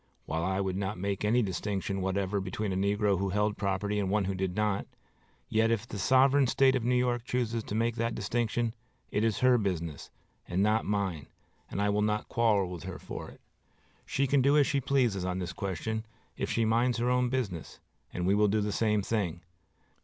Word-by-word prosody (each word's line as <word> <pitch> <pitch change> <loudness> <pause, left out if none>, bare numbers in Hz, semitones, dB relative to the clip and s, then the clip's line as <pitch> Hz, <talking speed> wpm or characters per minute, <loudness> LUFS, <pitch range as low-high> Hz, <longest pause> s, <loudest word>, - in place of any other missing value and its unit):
While 80 +2 -2
I 95 +2 0
would 95 -1 -1
not 100 +1 -2
make 100 +1 -2
any 115 +4 +3
distinction 95 0 -2
whatever 95 +1 0
between 95 +1 -3
a - - -2
negro 100 0 +1
who 100 0 0
held 105 +2 +1
property 100 +1 -1
and 100 -2 -1
one 105 0 +1
who 95 - -1
did 95 -1 -2
not, 105 -2 0 0.6
yet 110 +1 +2
if 115 0 0
the 105 - -6
sovereign 135 +5 +4
State 135 +1 +4
of 125 - -1
New 125 +1 +2
York 125 -1 +1
chooses 120 -2 -1
to 105 - -4
make 115 +1 +1
that 115 0 -1
distinction 115 +2 -1 0.4
it 105 - +1
is 115 -3 +1
her 125 -1 +5
business, 85 -7 -3 0.4
and 95 +3 +1
not 110 +1 +2
mine; 95 -7 -2 0.4
and - - -4
I 105 0 +2
will 105 +1 +1
not 105 0 0
quarrel 105 -6 +2
with 90 -3 -6
her - - -6
for - - -7
it. - - -16 0.6
She 140 - 0
can 140 0 +3
do 140 +3 +4
as 145 - +5
she 140 -2 0
pleases 120 -8 +1
on 90 0 -2
this 90 -1 -4
question 100 +4 -3 0.3
if - - -3
she 115 - +1
minds 120 +2 +2
her 120 +1 +1
own 125 0 +2
business, 105 -11 -3 0.3
and 90 - -3
we 95 - +3
will 105 +1 +4
do 105 +2 +2
the 105 0 -1
same 105 -1 +1
thing. 95 -6 -1
105 Hz, 210 wpm, -30 LUFS, 95-115 Hz, 0.6 s, her